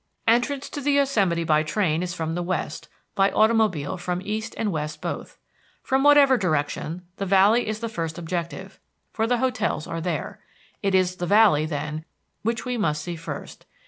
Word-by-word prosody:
Entrance 245 +5 +2
to 290 - -6
the 285 +1 +1
Yosemite 210 -12 +2
by 155 -1 +3
train 160 0 0
is 175 -1 -3
from 160 -1 -3
the 175 - -2
west, 180 +1 -3 0.2
by 195 -1 +3
automobile 215 -8 +2
from 175 0 -3
east 215 +1 -3
and 215 -2 0
west 150 -1 -4
both. - - -5 0.5
From 265 0 +1
whatever 285 -3 +6
direction, 160 0 -1
the 200 - -2
Valley 200 +5 +4
is 215 +1 -3
the 230 - -2
first 165 -8 -4
objective, 170 +1 -5 0.3
for 225 0 -1
the 245 +1 +2
hotels 250 - -1
are 165 0 -4
there. 165 -3 -3 0.4
It 195 -1 +1
is 185 -1 +2
the 175 - -3
Valley, 200 -7 +5
then, 150 0 -4 0.4
which 230 +2 -2
we 250 -1 -2
must 150 -6 0
see 175 -1 -4
first. 165 0 -8
185 Hz, 175 wpm, -24 LUFS, 165-225 Hz, 0.5 s, whatever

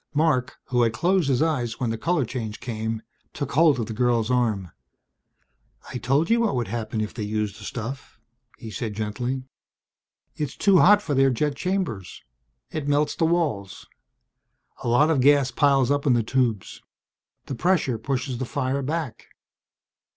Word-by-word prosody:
Marc, 145 -5 +1
who 125 -1 +2
had 115 -2 +2
closed 175 +4 +1
his 130 +2 +2
eyes 125 -8 -1
when 120 -3 0
the - - -1
color 165 -1 +1
change 110 -3 -5
came, 110 -1 -4 0.3
took 140 -2 -4
hold 155 -2 +4
of 115 - -1
the 110 - -6
girl's 120 0 +1
arm. 110 -8 0 1.2
"I 125 - -3
told 140 +7 +1
you 230 +1 +3
what 225 - +1
would 120 -5 -2
happen 110 -1 -3
if 105 - -4
they 115 - -6
used 105 0 -2
the - - -11
stuff," 125 +1 -6 0.4
he 110 - -9
said 110 -1 -4
gently. 120 +5 -3 0.9
"It's 150 -3 -4
too 195 -3 +5
hot 205 +4 +6
for 150 - -2
their 135 0 +4
jet 140 +3 0
chambers. 170 - -3 0.5
It 155 -3 -4
melts 145 +1 +2
the 165 - +1
walls. 155 - -1 1.0
A - - -3
lot 145 +7 +4
of 140 -5 +2
gas 140 -1 +4
piles 140 -2 +3
up 145 +1 0
in 130 - +5
the 120 -1 +2
tubes. 115 -4 -1 0.6
The - - -5
pressure 135 -5 +1
pushes 130 0 -3
the 130 - -2
fire 135 +2 -1
back. 145 -3 -4
130 Hz, 170 wpm, -24 LUFS, 115-145 Hz, 1.2 s, hot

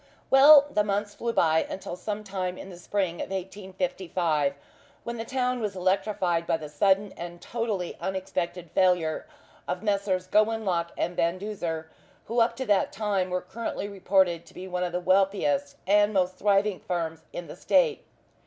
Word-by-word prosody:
Well, 280 +2 +9
the 210 - +2
months 205 0 -1
flew 235 - -2
by 160 -6 +3
until 180 -2 -5
some 210 +3 -4
time 185 -2 -3
in 190 - -9
the 175 - -10
spring 185 -2 -1
of - - -5
1855, 180 -5 -2 0.5
when 235 0 -5
the 225 - -3
town 250 0 -1
was 210 -4 -3
electrified 185 -2 0
by 165 - +2
the 150 -2 -8
sudden 195 +6 +2
and 175 0 -7
totally 215 -6 -3
unexpected 180 -3 -3
failure 180 - +2 0.4
of 180 +3 -3
Messrs. 200 -3 0
Gowanlock 210 -4 +1
and 175 - -1
Van 170 +2 +1
Duzer, 175 -6 -4 0.4
who 235 +2 -1
up 230 +1 +3
to 260 - -4
that 205 -4 +2
time 195 -3 -1
were 180 0 -1
currently 220 +1 -5
reported 190 -3 +1
to - - -17
be 185 +1 -7
one 180 -1 -2
of 180 - -2
the 175 - -1
wealthiest 205 +11 +1
and 205 +2 +4
most 185 -1 +2
thriving 200 0 +2
firms 165 -3 -3
in 175 - -6
the - - -9
State. - - +2
190 Hz, 170 wpm, -27 LUFS, 175-210 Hz, 0.5 s, Well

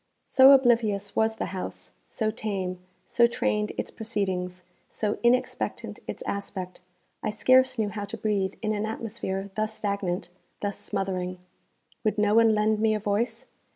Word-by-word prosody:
So 265 +1 +7
oblivious 230 -7 +3
was 220 0 +2
the - - -2
house, 185 - -6 0.2
so 220 -2 -1
tame, 195 -5 -3 0.3
so 235 -1 +4
trained 210 -3 0
its - - -3
proceedings, 185 -5 -3 0.3
so 210 -1 -2
inexpectant 250 +2 0
its - - -5
aspect, 190 -3 -5 0.4
I - - -1
scarce 255 +4 +4
knew 215 -2 +1
how 205 0 -4
to - - -7
breathe 200 -3 0
in 215 0 +1
an 210 +1 -1
atmosphere 200 -3 -4
thus 215 +1 -2
stagnant, 200 -4 -2 0.3
thus 205 -1 -3
smothering. 185 -2 -3 0.7
Would 215 -1 +1
no 210 0 +3
one 225 -1 +5
lend 215 0 +2
me 220 0 +3
a - - -1
voice? 225 +4 -1
210 Hz, 155 wpm, -27 LUFS, 195-225 Hz, 0.7 s, So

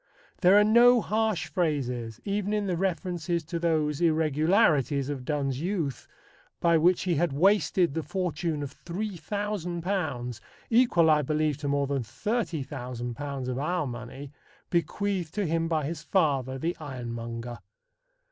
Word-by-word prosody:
There 190 +1 +6
are 210 - +7
no 240 +3 +6
harsh 220 -3 0
phrases 125 - -2
even 205 0 -1
in 210 -1 0
the 185 -2 0
references 175 -2 -1
to 170 +2 -4
those 155 -2 0
irregularities 155 - +2
of 135 -3 -4
Donne's 140 -2 -1
youth, 170 -7 -2 0.5
by 170 -1 +3
which 175 +3 +3
he 180 - +1
had 170 +1 +1
wasted 185 0 +3
the 160 - -1
fortune 170 -4 -2
of 140 -1 -6
£3,000 175 - -3 0.3
equal, 225 -9 +4
I 150 -1 +4
believe, 150 0 0
to 145 - -5
more 140 0 +1
than 140 -1 -1
£30,000 135 - -4
of 130 0 -2
our 175 +3 0
money 125 +2 -7 0.4
bequeathed 175 0 -1
to 205 -2 0
him 165 0 0
by 160 -3 0
his 155 +1 -4
father, 140 -6 +1
the 165 +6 -2
ironmonger. 120 -4 -6
160 Hz, 140 wpm, -27 LUFS, 140-185 Hz, 0.5 s, are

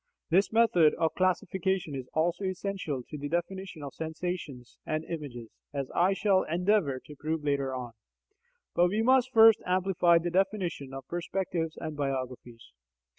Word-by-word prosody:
This 190 +4 +3
method 220 -9 +4
of 160 -1 0
classification 185 -2 0
is 130 -2 -6
also 170 +5 +1
essential 185 -7 -3
to 150 - -7
the 145 +1 -4
definition 175 0 -3
of 140 - -7
sensations 160 -6 -5
and 155 0 -2
images, 135 -8 -7 0.2
as 140 -2 -3
I 185 +3 +3
shall 195 -1 +3
endeavour 175 -5 +1
to 150 - -11
prove 155 +2 -3
later 140 -2 0
on. 125 -2 -5 0.8
But 175 - +4
we 210 +5 0
must 255 +1 +4
first 225 -2 +7
amplify 180 -2 +3
the 170 +1 -1
definition 185 -7 -1
of 135 -1 -8
perspectives 175 -2 -3
and 155 -2 -5
biographies. 130 - -4
170 Hz, 150 wpm, -29 LUFS, 145-190 Hz, 0.8 s, first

